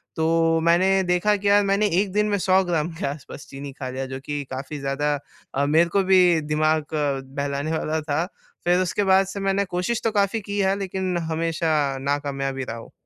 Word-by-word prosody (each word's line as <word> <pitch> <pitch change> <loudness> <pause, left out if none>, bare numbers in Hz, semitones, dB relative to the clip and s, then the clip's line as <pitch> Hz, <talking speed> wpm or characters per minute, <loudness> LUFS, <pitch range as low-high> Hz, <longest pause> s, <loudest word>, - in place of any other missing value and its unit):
तो 165 0 +2
मैंने 170 +3 +4 0.2
देखा 180 +4 +2
के 200 0 -3
यार 205 0 +5
मैंने 200 +2 +2
1 200 -2 -3
दिन 210 +1 +2
में 205 - +1
100 190 +1 +3
ग्राम 165 -2 0
के - - -4
आस 140 0 -5
पास - - -9
चीनी 140 +1 -7
खा 130 -2 -6
लिया। 130 +1 -4
जो 130 0 -6
कि 145 -1 -3
काफ़ी 135 +3 -5
ज़्यादा 140 +2 -1 0.4
अ, 140 +1 +2
मेरे 160 +4 +3
को 195 +3 +2
भी 190 0 +5 0.2
दिमाग 155 +1 0
अ, 145 -3 0
बहलाने 140 +1 -2
वाला 155 0 -2
था। 150 +2 -1 0.4
फ़िर 175 +1 +4
उसके 185 +3 0
बाद 190 0 +4
से 195 +1 -6
मैंने 195 0 +1
कोशिश 180 +6 -2
तो 225 - +1
काफ़ी 205 +1 +1
की 205 0 -4
है। 195 0 +2
लेकिन 190 -2 -2
हमेशा 165 0 0 0.3
नाकामयाब 140 -1 -2
ही 135 - -2
रहा 115 -1 -5
हूँ। 115 - -11
165 Hz, 210 wpm, -23 LUFS, 145-190 Hz, 0.4 s, यार